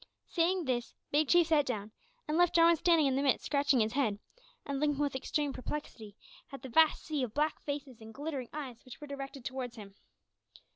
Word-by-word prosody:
Saying 350 Hz, +1 st, +1 dB
this, 245 Hz, -2 st, -2 dB, 0.2 s
Big 295 Hz, +1 st, +3 dB
Chief 345 Hz, +2 st, +5 dB
sat 310 Hz, -2 st, +3 dB
down, 215 Hz, -4 st, -3 dB, 0.4 s
and 305 Hz, -, -1 dB
left 350 Hz, 0 st, +3 dB
Jarwin 335 Hz, 0 st, +6 dB
standing 330 Hz, -1 st, +3 dB
in 270 Hz, -1 st, +2 dB
the 275 Hz, -, +1 dB
midst 275 Hz, -2 st, +1 dB
scratching 280 Hz, -3 st, +2 dB
his 215 Hz, 0 st, 0 dB
head, 240 Hz, -7 st, +1 dB, 0.5 s
and 280 Hz, -1 st, -3 dB
looking 295 Hz, -1 st, +1 dB
with 285 Hz, -2 st, 0 dB
extreme 285 Hz, +2 st, -1 dB
perplexity 230 Hz, -7 st, -6 dB, 0.4 s
at 275 Hz, 0 st, -9 dB
the 265 Hz, -, -7 dB
vast 315 Hz, +5 st, +4 dB
sea 305 Hz, -3 st, -2 dB
of 240 Hz, -4 st, -3 dB
black 300 Hz, +1 st, 0 dB
faces 280 Hz, -5 st, -5 dB
and 220 Hz, 0 st, -10 dB
glittering 275 Hz, -1 st, -5 dB
eyes 265 Hz, -6 st, -7 dB
which 255 Hz, -, -12 dB
were 300 Hz, -, -8 dB
directed 275 Hz, -2 st, -7 dB
towards 255 Hz, -2 st, -4 dB
him. 205 Hz, -3 st, -11 dB
280 Hz, 200 wpm, -32 LUFS, 250-300 Hz, 0.5 s, Jarwin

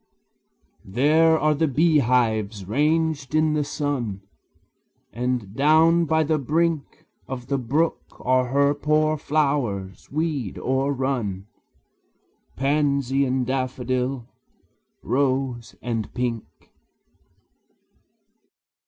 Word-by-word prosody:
There 155 Hz, +9 st, +3 dB
are 155 Hz, 0 st, +2 dB
the 160 Hz, +2 st, +1 dB
beehives 120 Hz, -, +1 dB
ranged 150 Hz, -, 0 dB
in 155 Hz, 0 st, +3 dB
the 150 Hz, -1 st, +1 dB
sun; 135 Hz, -10 st, -3 dB, 0.9 s
And 120 Hz, -3 st, -3 dB
down 160 Hz, +4 st, +4 dB
by 160 Hz, 0 st, +2 dB
the 155 Hz, 0 st, 0 dB
brink 160 Hz, +2 st, -1 dB, 0.2 s
Of 125 Hz, -1 st, -7 dB
the 140 Hz, -1 st, 0 dB
brook 145 Hz, +7 st, 0 dB, 0.2 s
are 130 Hz, 0 st, +2 dB
her 140 Hz, +3 st, +2 dB
poor 155 Hz, +1 st, +1 dB
flowers, 140 Hz, -, -1 dB
weed 145 Hz, -, -2 dB
o'errun, 130 Hz, -7 st, -1 dB, 1.1 s
Pansy 140 Hz, -1 st, +1 dB
and 130 Hz, -1 st, 0 dB
daffodil, 130 Hz, -1 st, -2 dB, 0.8 s
rose 130 Hz, -3 st, -1 dB
and 115 Hz, -3 st, -3 dB
pink. 120 Hz, -3 st, -2 dB
135 Hz, 90 wpm, -23 LUFS, 125-150 Hz, 1.1 s, down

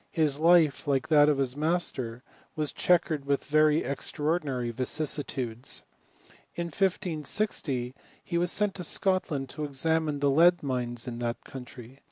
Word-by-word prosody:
His 150 Hz, -4 st, 0 dB
life, 165 Hz, -4 st, +4 dB
like 135 Hz, -2 st, 0 dB
that 150 Hz, -1 st, +6 dB
of 145 Hz, -, +2 dB
his 135 Hz, -2 st, -1 dB
master, 145 Hz, -7 st, -1 dB, 0.3 s
was 150 Hz, -2 st, -1 dB
checkered 160 Hz, -5 st, +1 dB
with 140 Hz, 0 st, 0 dB
very 155 Hz, 0 st, +3 dB
extra 140 Hz, +2 st, -4 dB
ordinary 140 Hz, -7 st, 0 dB
vicissitudes. 130 Hz, -2 st, -3 dB, 0.7 s
In 170 Hz, -, -2 dB
1560 165 Hz, -, -1 dB, 0.3 s
he 170 Hz, -, -2 dB
was 175 Hz, 0 st, +1 dB
sent 210 Hz, -1 st, +1 dB
to 180 Hz, -, -6 dB
Scot 185 Hz, +2 st, +1 dB
land 135 Hz, -4 st, -3 dB
to 150 Hz, -, -5 dB
examine 150 Hz, +1 st, 0 dB
the 140 Hz, 0 st, +2 dB
lead 175 Hz, +4 st, +5 dB
mines 125 Hz, -3 st, -3 dB
in 120 Hz, -1 st, -5 dB
that 120 Hz, -1 st, -3 dB
country. 125 Hz, 0 st, -11 dB
145 Hz, 150 wpm, -28 LUFS, 130-165 Hz, 0.7 s, that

